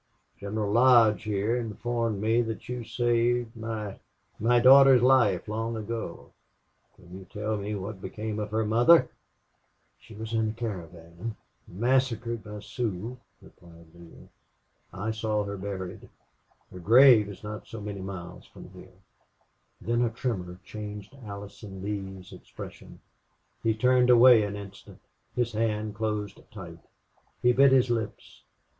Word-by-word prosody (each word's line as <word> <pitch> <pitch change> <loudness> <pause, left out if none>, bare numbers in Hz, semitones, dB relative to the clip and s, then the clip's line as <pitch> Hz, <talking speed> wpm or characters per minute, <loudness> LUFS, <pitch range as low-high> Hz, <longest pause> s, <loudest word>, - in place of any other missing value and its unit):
"General 100 +1 -3
Lodge 120 -2 +5
here 105 +2 0
informed 115 -1 -2
me 110 +3 +2
that 115 -2 -5
you 125 -1 -4
saved 120 +1 0
my 110 -3 -5 0.4
my 120 +3 +3
daughter's 130 0 +7
life 130 -3 +3
long 115 +2 -3
ago.... 110 +1 -6 0.6
Can 90 +2 -12
you 95 - -12
tell 105 +3 -3
me 105 +1 -4
what 100 0 -6
became 110 +1 -5
of 105 0 -3
her 110 +1 0
mother?" 120 +10 +5 0.9
"She 110 - -15
was 110 +1 -7
in 110 -1 +1
the 110 - -3
caravan 90 -2 -7 0.3
massacred 120 +1 0
by 105 -1 -8
Sioux," 115 +2 -4 0.2
replied 85 -1 -18
Neale. 85 -1 -15 0.6
"I 100 +4 -3
saw 110 -1 -1
her 100 0 -5
buried. 95 0 -6 0.6
Her 90 - -9
grave 115 +2 +6
is 100 - -11
not 105 0 -7
so 115 - -8
many 100 -2 -6
miles 95 -2 -8
from - - -13
here." - - -15 0.8
Then 120 +1 -1
a 120 - +2
tremor 100 -7 -4
changed 105 +2 -8
Allison 100 -1 -9
Lee's 95 -2 -6
expression. - - -11 0.6
He 110 -1 +1
turned 125 +2 +3
away 120 -1 +8
an 100 -1 -3
instant: 100 -1 -11 0.4
his 120 -1 0
hand 110 -1 -1
closed 105 -1 -3
tight; - - -10 0.6
he 125 0 +3
bit 135 +2 +5
his 130 -2 +4
lips. 115 -3 -4
110 Hz, 140 wpm, -27 LUFS, 100-120 Hz, 0.9 s, away